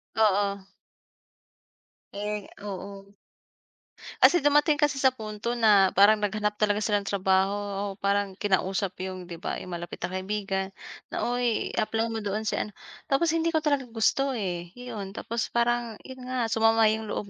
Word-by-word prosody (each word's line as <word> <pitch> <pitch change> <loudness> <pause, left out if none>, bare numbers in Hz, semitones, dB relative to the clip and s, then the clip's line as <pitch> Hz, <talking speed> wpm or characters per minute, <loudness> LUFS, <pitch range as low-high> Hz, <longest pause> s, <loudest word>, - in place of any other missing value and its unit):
Oo. 200 -2 +2 1.5
Eh 210 +1 -4
oo. 200 0 -8 1.1
Kasi 350 -5 +6
dumating 295 +1 +4
kasi 290 -1 +1
sa 265 -1 +4
punto 220 0 -4
na 210 -5 +5
parang 205 +3 +7
naghanap 210 0 -1
talaga 210 0 +2
sila 205 -1 +2
ng 200 - -10
trabaho 190 0 +2
o 205 -1 -3
parang 200 0 0
kinausap 190 -1 0
'yung 185 -1 -6
'di 170 - -6
ba - - -3
'yung 180 - -8
malapit 175 0 -6
na - - -1
kaibigan 190 0 -2 0.5
na, - - -1
"Oy, 245 -2 0
apply 225 +1 0
mo 225 - -2
doon 210 +1 -2
si 215 - -1
ano," 210 - -4 0.3
tapos 310 +4 +2
hindi 330 0 0
ko 315 - +2
talaga 285 -4 +1
gusto, 250 +4 +1
eh. 175 -5 -4
Iyon, 225 -6 -7
tapos 230 0 -3
parang 235 -1 +1
'yun 260 -1 -10
nga, 250 -3 -1
sumama 225 0 +4
'yung 220 0 -3
loob 205 - -4
210 Hz, 160 wpm, -27 LUFS, 195-235 Hz, 1.5 s, parang